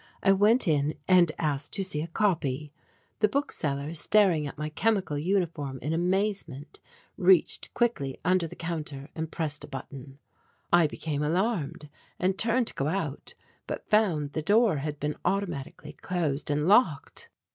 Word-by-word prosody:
I 195 - +5
went 210 +4 +4
in 150 -1 +1
and 180 -3 +5
asked 150 -2 -2
to 195 - +1
see 155 -6 0
a 160 - -4
copy. 155 -7 -1 0.5
The 210 - +4
book 280 +7 -1
seller 140 +1 -2
staring 170 -3 +3
at 140 - -9
my 150 +1 -3
chemical 195 -1 0
uniform 160 -4 -1
in 155 - -1
amazement 175 -5 -2 0.4
reached 185 -3 +3
quickly 185 - 0
under 180 -2 +2
the - - -11
counter 155 -4 -5
and 160 0 -5
pressed 155 -2 -3
a - - -8
button. 135 0 -9 0.6
I 175 -2 +6
became 150 -1 -4
alarmed 165 -2 -1 0.3
and 185 +1 +1
turned 230 +4 +1
to - - -6
go 135 - -2
out 155 -4 -3 0.3
but - - -6
found 175 -10 +2
the 155 - -2
door 205 +1 +3
had 150 +1 -4
been 150 +1 -2
automatically 180 -8 -3
closed 160 -6 -2
and 150 +2 0
locked. 200 - +2
160 Hz, 155 wpm, -28 LUFS, 150-195 Hz, 0.6 s, I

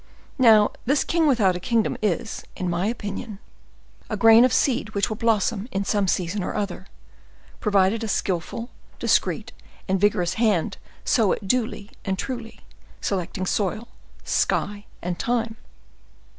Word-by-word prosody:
Now, 220 -4 +6
this 280 +4 +2
king 330 -2 +2
without 215 -10 +3
a - - -3
kingdom 225 +3 +1
is, 215 +2 -1
in 180 -1 -2
my 175 +3 0
opinion, 215 -1 -5 0.7
a 215 - -2
grain 225 +3 +7
of 255 - +4
seed 225 -5 +1
which 200 - +1
will 215 - -2
blossom 220 0 0
in 200 -4 -1
some 205 -2 +1
season 180 +2 -1
or - - -4
other, 200 -2 -3 0.7
provided 205 +1 +2
a - - -2
skillful, 200 +5 -2 0.3
discreet, - - +1 0.4
and 190 -1 0
vigorous 180 -4 +2
hand 205 -8 +1 0.3
sow 225 -7 +3
it 200 - -6
duly 220 -2 -1
and 190 -2 -2
truly, 235 -1 -6 0.4
selecting 185 0 -2
soil, 210 +4 -1 0.3
sky, 205 0 0 0.2
and 175 0 -3
time." 230 -2 -1
210 Hz, 145 wpm, -24 LUFS, 195-230 Hz, 0.7 s, grain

